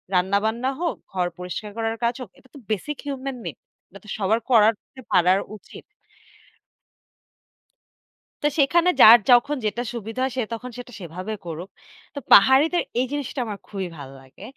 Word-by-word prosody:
রান্না-বান্না 215 Hz, +7 st, +1 dB
হোক, 345 Hz, -, -1 dB, 0.2 s
ঘর 180 Hz, -2 st, -1 dB
পরিষ্কার 180 Hz, +4 st, -6 dB
করার 225 Hz, 0 st, -1 dB
কাজ 235 Hz, +1 st, +1 dB
হোক 240 Hz, -, -8 dB
এটা 260 Hz, -1 st, -23 dB
তো -, -, -10 dB
basic 240 Hz, +8 st, -3 dB
human 270 Hz, -2 st, -4 dB
make -, -, -7 dB, 0.3 s
এটা -, -, -14 dB
তো -, -, -13 dB
সবার 215 Hz, +3 st, +1 dB
করাত 225 Hz, -2 st, +5 dB, 0.2 s
তে 260 Hz, -, -10 dB
পারার 180 Hz, +2 st, +4 dB, 0.2 s
উচিত। -, -, -13 dB, 2.6 s
তো -, -, +1 dB
সেখানে 335 Hz, +5 st, +3 dB
যার 230 Hz, +1 st, +10 dB
যখন 245 Hz, +4 st, +4 dB
যেটা 220 Hz, +3 st, -1 dB
সুবিধা 225 Hz, +2 st, -6 dB
হয় 260 Hz, -1 st, -1 dB
সে 255 Hz, -, 0 dB
তখন 250 Hz, +2 st, -7 dB
সেটা 245 Hz, 0 st, -9 dB
সেভাবে 185 Hz, +4 st, -6 dB
করুক। 170 Hz, +2 st, -7 dB, 0.5 s
তো 285 Hz, -, -5 dB
পাহাড়িদের 275 Hz, -, +6 dB, 0.2 s
এই 255 Hz, -, +1 dB
জিনিসটা 280 Hz, -2 st, -4 dB
আমার 205 Hz, -2 st, -6 dB
খুবই 195 Hz, -3 st, -4 dB
ভালো 135 Hz, -1 st, -9 dB
লাগে। 135 Hz, +8 st, -19 dB
225 Hz, 160 wpm, -23 LUFS, 195-260 Hz, 2.6 s, যার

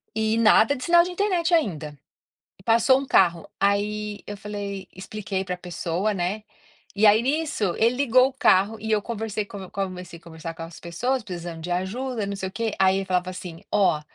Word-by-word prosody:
E 220 Hz, 0 st, +1 dB
nada 230 Hz, +4 st, +5 dB
de 255 Hz, -, -7 dB
sinal 340 Hz, +2 st, +6 dB
de 360 Hz, -, -4 dB
internet 360 Hz, -2 st, 0 dB
ainda. 155 Hz, -, 0 dB, 0.6 s
E 190 Hz, -, -18 dB
passou 235 Hz, +5 st, +4 dB
um 275 Hz, -, -6 dB
carro, 170 Hz, -6 st, +3 dB
aí 205 Hz, +1 st, 0 dB
eu 205 Hz, -, -6 dB
falei 200 Hz, -2 st, -6 dB
expliquei 190 Hz, 0 st, -4 dB
para 180 Hz, -1 st, -3 dB
pessoa, 180 Hz, +3 st, -2 dB
né, 190 Hz, +3 st, -2 dB, 0.5 s
e 210 Hz, +2 st, +4 dB
aí 210 Hz, +2 st, +6 dB
nisso, 270 Hz, -, 0 dB
ele 230 Hz, +2 st, +3 dB
ligou 255 Hz, -1 st, +4 dB
o -, -, -11 dB
carro, 215 Hz, -3 st, +3 dB
e 220 Hz, +1 st, -4 dB
eu 215 Hz, -, +3 dB
conversei 220 Hz, -2 st, -3 dB
co 195 Hz, -2 st, -9 dB
comecei 185 Hz, -3 st, -5 dB
a -, -, -25 dB
conversar 165 Hz, 0 st, -8 dB
com 165 Hz, -, -8 dB
as 165 Hz, 0 st, -9 dB
pessoas, 245 Hz, +10 st, -2 dB
precisando 175 Hz, -4 st, -7 dB
de 180 Hz, -, -5 dB
ajuda, 220 Hz, +7 st, -2 dB
e -, -, -4 dB
não 200 Hz, -, -3 dB
sei 190 Hz, -1 st, -4 dB
o -, -, -12 dB
quê, 225 Hz, +2 st, -2 dB
aí 190 Hz, 0 st, +4 dB
ele 195 Hz, -, -2 dB
falava 185 Hz, -1 st, 0 dB
assim: 180 Hz, -2 st, -8 dB
"Ó, 195 Hz, -7 st, +3 dB
200 Hz, 205 wpm, -24 LUFS, 180-230 Hz, 0.6 s, sinal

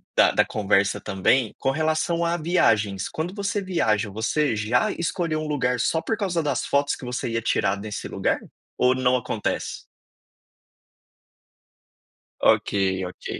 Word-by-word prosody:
da -, -, +5 dB
da -, -, +3 dB
conversa 100 Hz, -1 st, +1 dB
também, 105 Hz, +5 st, +1 dB
com 135 Hz, -, +1 dB
relação 160 Hz, +3 st, 0 dB
a 170 Hz, 0 st, +1 dB
viagens, 105 Hz, -, +1 dB
quando 165 Hz, +4 st, -4 dB
você 200 Hz, 0 st, -2 dB
viaja, 110 Hz, -, 0 dB
você 115 Hz, +6 st, 0 dB
já 110 Hz, +4 st, +1 dB
escolheu 165 Hz, -2 st, -2 dB
um 155 Hz, -, -4 dB
lugar 125 Hz, -4 st, 0 dB
só 160 Hz, +5 st, +1 dB
por 225 Hz, -, -2 dB
causa 180 Hz, -6 st, -1 dB
das 150 Hz, -, -1 dB
fotos 140 Hz, 0 st, +1 dB
que -, -, -10 dB
você 125 Hz, -1 st, -3 dB
ia 115 Hz, -, -1 dB
tirar 100 Hz, -3 st, 0 dB
nesse 105 Hz, +1 st, -5 dB
lugar? -, -, 0 dB, 0.4 s
Ou 125 Hz, 0 st, +4 dB
não 130 Hz, 0 st, +2 dB
acontece? 120 Hz, -, -3 dB, 2.6 s
Ok, -, -, +3 dB, 0.3 s
ok. 90 Hz, -, -10 dB
130 Hz, 145 wpm, -24 LUFS, 110-165 Hz, 2.6 s, da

